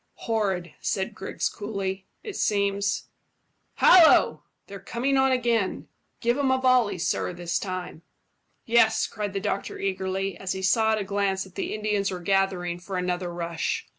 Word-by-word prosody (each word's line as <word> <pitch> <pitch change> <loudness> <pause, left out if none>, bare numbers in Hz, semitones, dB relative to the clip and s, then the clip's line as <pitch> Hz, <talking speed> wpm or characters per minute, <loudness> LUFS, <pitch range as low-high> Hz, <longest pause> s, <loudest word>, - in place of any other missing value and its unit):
"Horrid," 195 -7 -1
said 190 -1 -1
Griggs 195 - -3
coolly. 195 -2 -4 0.2
"It 420 -4 -6
seems 200 -1 0 0.7
Hallo! 350 -3 +6 0.2
They're 200 0 -9
coming 255 +7 -1
on 265 0 +4
again. 235 -6 0 0.3
Give 240 +3 +1
'em 275 -2 +2
a 260 0 +2
volley, 250 -6 +3
sir, 180 +1 -1
this 175 -1 -2
time." 185 -4 -5 0.6
"Yes," 225 -1 +4
cried 205 -2 -4
the 195 - -1
doctor 200 0 -3
eagerly, 195 0 -2
as 190 -2 -3
he 190 - -5
saw 220 +3 +3
at - - +1
a 210 - -2
glance 195 -1 0
that 190 - -15
the - - -3
Indians 210 -2 0
were 185 - -4
gathering 180 -1 0
for 185 +1 -5
another 180 0 -2
rush. 170 -1 -3
195 Hz, 160 wpm, -26 LUFS, 185-220 Hz, 0.7 s, Hallo